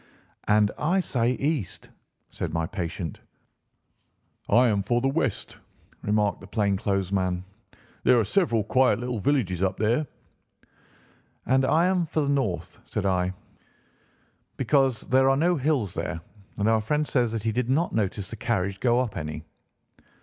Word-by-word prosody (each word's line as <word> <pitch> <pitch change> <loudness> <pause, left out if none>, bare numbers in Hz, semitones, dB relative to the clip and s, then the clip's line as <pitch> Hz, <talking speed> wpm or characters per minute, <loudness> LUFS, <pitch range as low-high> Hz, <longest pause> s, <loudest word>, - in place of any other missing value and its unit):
"And 105 0 +4
I 175 +6 +2
say 125 -8 +1
east," 140 - -3 0.4
said 85 - -4
my 80 0 0
patient. 85 -3 -5 1.3
"I 125 +1 +5
am 105 -3 +1
for 120 +5 +1
west," 135 - -1 0.4
remarked 105 -1 0
the 95 - -11
plain 100 -2 +1
clothes 95 -2 -1
man. 90 -2 0 0.6
"There 125 -1 +5
are 110 - +1
several 115 - +1
quiet 125 -1 +3
little 120 -2 -3
villages 105 -9 0
up 95 0 0
there." 115 +8 +1 1.4
"And 130 +2 +3
I 160 +5 +3
am 180 -2 +1
for 150 -1 -1
north," 135 -11 -1
said - - -4
I, 90 -1 +1 1.2
"because 135 -2 +2
there 130 +1 +3
are 135 - +3
no 175 +4 +3
hills 135 - 0
there, - - -3 0.4
and 105 0 0
our 110 -1 +3
friend 150 +7 0
says 120 -4 +1
that 110 -2 -3
he 110 - +1
did 125 +2 -1
not 160 +6 +1
notice 100 -2 -1
the - - -5
carriage 100 -3 -1
go 120 -1 +3
up 120 -5 -3
any." 75 -2 -5
115 Hz, 150 wpm, -26 LUFS, 100-135 Hz, 1.4 s, I